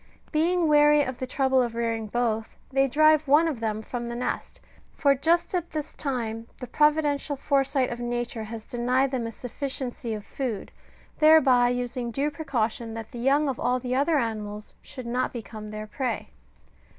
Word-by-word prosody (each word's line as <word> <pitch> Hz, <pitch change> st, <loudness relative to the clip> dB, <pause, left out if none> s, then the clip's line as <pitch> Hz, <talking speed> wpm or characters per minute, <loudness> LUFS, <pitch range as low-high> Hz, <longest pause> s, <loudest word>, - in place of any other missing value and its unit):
Being 335 Hz, +2 st, +2 dB
weary 295 Hz, 0 st, +6 dB
of 260 Hz, -2 st, -5 dB
the 255 Hz, -, -3 dB
trouble 265 Hz, 0 st, +2 dB
of 235 Hz, -2 st, -2 dB
rearing 230 Hz, -1 st, -1 dB
both, 225 Hz, -1 st, -1 dB
they 270 Hz, 0 st, +3 dB
drive 310 Hz, +2 st, +4 dB
one 300 Hz, +4 st, +5 dB
of 290 Hz, -7 st, -2 dB
them 220 Hz, -1 st, -2 dB
from 240 Hz, +1 st, -5 dB
the 235 Hz, -, -4 dB
nest: 245 Hz, +1 st, -4 dB, 0.4 s
for 280 Hz, -2 st, +4 dB
just 330 Hz, +7 st, +1 dB
at 350 Hz, -2 st, -1 dB
this 305 Hz, -1 st, -5 dB
time 230 Hz, -5 st, -3 dB
the 250 Hz, -, -6 dB
providential 295 Hz, +1 st, +2 dB
foresight 275 Hz, -1 st, +1 dB
of 240 Hz, -, -5 dB
Nature 240 Hz, -2 st, -3 dB
has 220 Hz, 0 st, -7 dB
denied 250 Hz, +3 st, +1 dB
them 245 Hz, -4 st, -2 dB
a -, -, -5 dB
suf&ciency 245 Hz, -2 st, -4 dB
of 210 Hz, -, -11 dB
food, 245 Hz, -7 st, -4 dB, 0.5 s
thereby 270 Hz, -6 st, +6 dB
using 245 Hz, 0 st, -2 dB
due 280 Hz, +5 st, -1 dB
precaution 235 Hz, -6 st, -2 dB
that 225 Hz, -1 st, -7 dB
the 240 Hz, -, -7 dB
young 280 Hz, +4 st, +3 dB
of 265 Hz, -3 st, -2 dB
all 250 Hz, +1 st, +1 dB
the 250 Hz, 0 st, -3 dB
other 290 Hz, +4 st, +2 dB
animals 215 Hz, -4 st, -3 dB
should 255 Hz, -, -9 dB
not 250 Hz, +2 st, -1 dB
become 220 Hz, -2 st, -8 dB
their 215 Hz, 0 st, -6 dB
prey. 245 Hz, +2 st, -3 dB
250 Hz, 175 wpm, -26 LUFS, 230-285 Hz, 0.5 s, weary